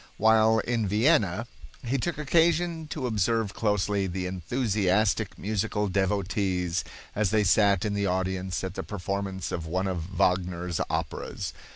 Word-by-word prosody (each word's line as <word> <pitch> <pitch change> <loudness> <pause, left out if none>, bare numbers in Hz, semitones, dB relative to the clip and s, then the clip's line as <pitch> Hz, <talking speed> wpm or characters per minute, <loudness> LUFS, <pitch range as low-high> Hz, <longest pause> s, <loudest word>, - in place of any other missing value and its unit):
While 110 +1 +5
in 115 -1 0
Vienna 110 - +2 0.4
he 130 +3 0
took 175 +6 -2
occasion 165 +1 +2
to 145 -3 -4
observe 110 -2 0
closely 105 -2 0
the 90 0 -3
enthusiastic 100 +1 0
musical 105 0 -1
devotees 95 -2 0 0.3
as 105 -2 +1
they 110 +1 +3
sat 100 0 +4
in 105 - -1
the 100 0 0
audience 95 0 -1
at 95 -1 -3
the - - -4
performance 100 -1 -4
of 80 -2 -4
one 95 +4 -1
of 90 -3 -3
Wagner's 90 -1 0
operas. - - -3
100 Hz, 140 wpm, -27 LUFS, 95-110 Hz, 0.4 s, While